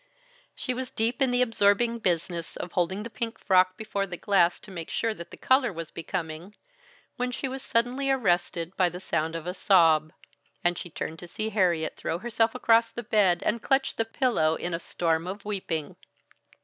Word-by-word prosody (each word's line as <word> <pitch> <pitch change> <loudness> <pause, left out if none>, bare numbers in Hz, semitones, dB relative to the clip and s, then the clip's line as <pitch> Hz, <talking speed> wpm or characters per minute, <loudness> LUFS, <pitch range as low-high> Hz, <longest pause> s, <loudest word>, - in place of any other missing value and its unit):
She 255 - -3
was 255 0 -4
deep 230 +4 -1
in 265 - +4
the 245 0 +3
absorbing 230 +1 +2
business 170 -3 -1
of 175 - -6
holding 190 +3 0
the 230 - -6
pink 230 -1 -4
frock 185 -1 +3
before 200 -2 -2
the 175 -1 -6
glass 180 -3 +3
to 205 - -12
make 170 -3 -7
sure 225 -1 0
that 170 -4 -10
the - - -11
color 260 -2 +3
was 165 -3 -7
becoming, 165 +2 -5 0.6
when 250 0 -1
she 265 - -3
was 265 +1 -5
suddenly 250 +4 0
arrested 180 -7 0
by 180 -2 +3
the 175 +1 -8
sound 165 -3 -1
of 165 -1 -5
a 180 - -3
sob, 165 -6 +4 0.5
and 175 0 +2
she 175 - -7
turned 160 0 -5
to 175 - -9
see 215 +5 -3
Harriet 180 -7 +1
throw 165 - -2
herself 225 +3 0
across 230 -2 +4
the 235 +1 -7
bed 205 -6 +3
and 230 +1 0
clutch 270 +1 +1
the 225 - +1
pillow 225 - +1
in 175 +1 -4
a 165 - -1
storm 165 -1 -1
of 200 +2 -6
weeping. 180 -7 -3
195 Hz, 195 wpm, -27 LUFS, 170-230 Hz, 0.6 s, in